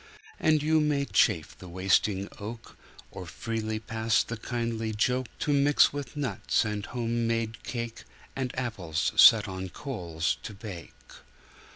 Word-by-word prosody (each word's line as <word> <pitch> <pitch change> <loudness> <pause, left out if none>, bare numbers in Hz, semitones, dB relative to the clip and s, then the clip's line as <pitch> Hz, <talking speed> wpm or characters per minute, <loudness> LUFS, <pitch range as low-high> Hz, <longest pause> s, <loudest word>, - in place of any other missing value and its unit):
And 155 -2 +3
you 155 +1 +3
may 145 -2 +1
chafe - - +2
the 90 - -10
wasting 95 +2 +1
oak, 110 +3 -8 0.4
Or 90 - -8
freely 110 - -3
pass 110 +1 +1
the 115 - -5
kindly 115 -1 -3
joke 125 +4 +1
To 150 - +1
mix 140 +1 +4
with 145 -1 -6
nuts 135 -4 0
and 105 -1 -3
home 120 -1 -1
made 115 -1 -2
cake 115 -2 -5 0.3
And 130 -2 -2
apples 90 -11 -1
set 110 -1 +8
on 95 0 -5
coals 85 - -3
to 110 - -8
bake. 95 -6 -9
115 Hz, 145 wpm, -28 LUFS, 100-125 Hz, 0.4 s, set